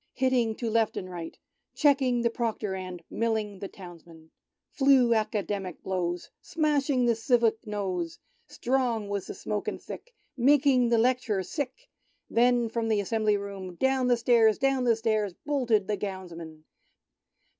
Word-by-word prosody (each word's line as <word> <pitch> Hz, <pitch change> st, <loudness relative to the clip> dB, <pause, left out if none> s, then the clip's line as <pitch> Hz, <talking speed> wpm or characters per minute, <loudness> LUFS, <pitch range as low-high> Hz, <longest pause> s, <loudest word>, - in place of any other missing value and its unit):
Hitting 250 Hz, -4 st, +1 dB
to 235 Hz, -, -4 dB
left 225 Hz, -1 st, +1 dB
and 185 Hz, -, -4 dB
right. 175 Hz, -3 st, -7 dB, 0.4 s
Cheeking 265 Hz, -5 st, +3 dB
the 235 Hz, -, +2 dB
Proctor, 225 Hz, -4 st, -2 dB
and 185 Hz, -2 st, -6 dB
Milling 220 Hz, -3 st, -1 dB
the 195 Hz, -, -5 dB
Townsmen. 170 Hz, -4 st, -13 dB, 0.4 s
Flew 265 Hz, -4 st, +4 dB
Academic 205 Hz, -4 st, -2 dB
blows, 175 Hz, -2 st, -3 dB
Smashing 295 Hz, -6 st, +1 dB
the 235 Hz, -, +4 dB
civic 225 Hz, 0 st, +1 dB
nose, 185 Hz, -5 st, -3 dB, 0.3 s
Strong 240 Hz, -5 st, -1 dB
was 200 Hz, -2 st, -3 dB
the -, -, -6 dB
smoke 210 Hz, -1 st, -4 dB
and -, -, -3 dB
thick. -, -, -10 dB, 0.2 s
Making 260 Hz, -1 st, +4 dB
the 235 Hz, -, +3 dB
Lect'rer 235 Hz, -4 st, +1 dB
sick 285 Hz, -, -5 dB, 0.2 s
— -, -, -44 dB
Then 240 Hz, 0 st, +3 dB
from 225 Hz, 0 st, -2 dB
the 215 Hz, -2 st, +2 dB
Assembly 215 Hz, +1 st, +1 dB
Room, 195 Hz, -3 st, -7 dB
Down 265 Hz, +4 st, +1 dB
the 245 Hz, -1 st, +3 dB
stairs, 230 Hz, -2 st, +4 dB
down 270 Hz, -2 st, +1 dB
the 235 Hz, -2 st, +4 dB
stairs, 215 Hz, -4 st, -1 dB
Boiled 285 Hz, -4 st, -1 dB
the 210 Hz, -2 st, +2 dB
Gownsmen 170 Hz, -5 st, -7 dB
225 Hz, 150 wpm, -28 LUFS, 195-250 Hz, 0.4 s, Flew